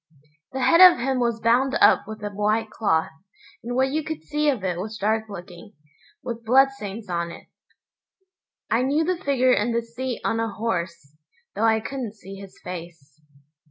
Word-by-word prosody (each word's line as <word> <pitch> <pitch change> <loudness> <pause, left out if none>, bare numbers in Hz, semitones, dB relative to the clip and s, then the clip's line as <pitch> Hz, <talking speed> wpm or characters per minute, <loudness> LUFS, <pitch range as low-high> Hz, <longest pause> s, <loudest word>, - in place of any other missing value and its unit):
The 265 - -4
head 335 +2 +5
of 365 -1 +10
him 260 +1 -1
was 235 -2 0
bound 245 +4 +2
up - - +5
with 215 -1 -8
a 205 - -3
white 215 +2 0
cloth, 160 -8 0 0.5
and 245 +1 -4
what 265 +1 +2
you 310 +2 -1
could 315 0 -6
see 300 0 0
of 250 -9 -1
it 180 -2 -2
was 215 +3 -5
dark 220 +2 0
looking, 180 +1 -10 0.5
with 235 -1 -5
bloodstains 230 -4 +1
on 170 -1 -2
it. - - -11 1.3
I 230 - +3
knew 285 +5 +1
the 360 +2 -2
figure 255 -2 +3
and 230 +2 0
the 235 - 0
seat 245 +2 -5
on 225 - 0
a 225 0 -1
horse, 170 -9 -4 0.4
though 215 +3 0
I 220 -1 +3
couldn't 240 -3 -5
see 195 -2 -11
his 195 -1 -12
face. 165 -5 -9
225 Hz, 180 wpm, -24 LUFS, 195-260 Hz, 1.3 s, of